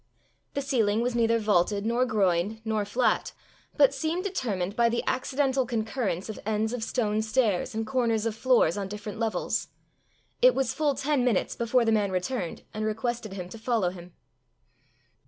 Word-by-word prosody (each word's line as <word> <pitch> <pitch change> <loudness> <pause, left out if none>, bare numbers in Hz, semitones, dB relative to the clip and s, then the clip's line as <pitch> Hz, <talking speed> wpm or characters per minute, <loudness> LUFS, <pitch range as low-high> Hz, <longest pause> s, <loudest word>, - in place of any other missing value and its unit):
The 280 - -1
ceiling 225 -6 +1
was 245 +1 0
neither 230 -1 +3
vaulted 205 -1 +1
nor 240 +3 +2
groined 195 0 +1
nor 215 -2 0
flat, 240 +5 0 0.4
but 280 -1 +6
seemed 320 +6 -2
determined 210 - -2
by 235 -1 +4
the 235 - -1
accidental 265 +1 +1
concurrence 220 -5 -2
of 220 - -6
ends 220 +2 -1
of 245 -2 -3
stone 215 -3 0
stairs 220 -1 0
and 225 0 -1
corners 230 -3 0
of 225 - 0
floors 225 -7 +3
on 195 - -3
different 210 +1 -7
levels. 225 -2 -1 0.7
It - - +6
was 265 -3 0
full 295 -3 +1
ten 280 -2 +1
minutes 240 -6 +1
before 235 +1 +2
the 225 - +3
man 205 -3 +2
returned 185 0 -3
and 215 - -3
requested 220 0 -2
him 180 -2 -6
to 225 - -10
follow 220 -6 0
him. 175 -1 -12
225 Hz, 170 wpm, -27 LUFS, 205-250 Hz, 0.7 s, but